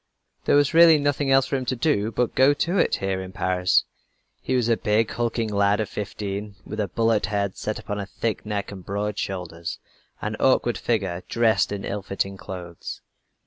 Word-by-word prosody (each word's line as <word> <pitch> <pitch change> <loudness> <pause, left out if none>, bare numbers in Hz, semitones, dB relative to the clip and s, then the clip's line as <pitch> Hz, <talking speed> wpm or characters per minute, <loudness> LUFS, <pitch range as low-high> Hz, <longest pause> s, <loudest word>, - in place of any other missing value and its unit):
There - - +4
was 145 +2 +3
really 165 -1 +8
nothing 145 -1 0
else 135 0 +5
for 135 - -1
him 130 - -4
to 130 - -1
do 115 -5 +1
but 120 +2 +1
to - - -34
"go 135 +2 +6
to 175 +6 0
it" - - +3
here 95 -1 -2
in 95 0 -7
Paris. 90 -1 +2 0.6
He 130 - -1
was 125 -2 +2
a 115 - +4
big, 110 +1 +1
hulking 115 -1 -1
lad 100 +1 +3
of 110 - -1
fifteen, 105 0 -5
with 105 - -6
a 105 - 0
bullet 115 +1 +1
head 100 -2 -1
set 110 - -3
upon 105 -1 -5
a 100 - -4
thick 110 +2 -3
neck 105 -2 -3
and 95 -2 -9
broad 105 +2 -3
shoulders 85 -3 -4 0.4
an 110 +1 -3
awkward 125 -2 +2
figure 95 -7 -1
dressed 110 -5 +2
in 100 -1 -4
ill 100 +1 -3
fitting 100 0 -3
clothes. 90 -3 -8
105 Hz, 200 wpm, -24 LUFS, 100-120 Hz, 0.6 s, really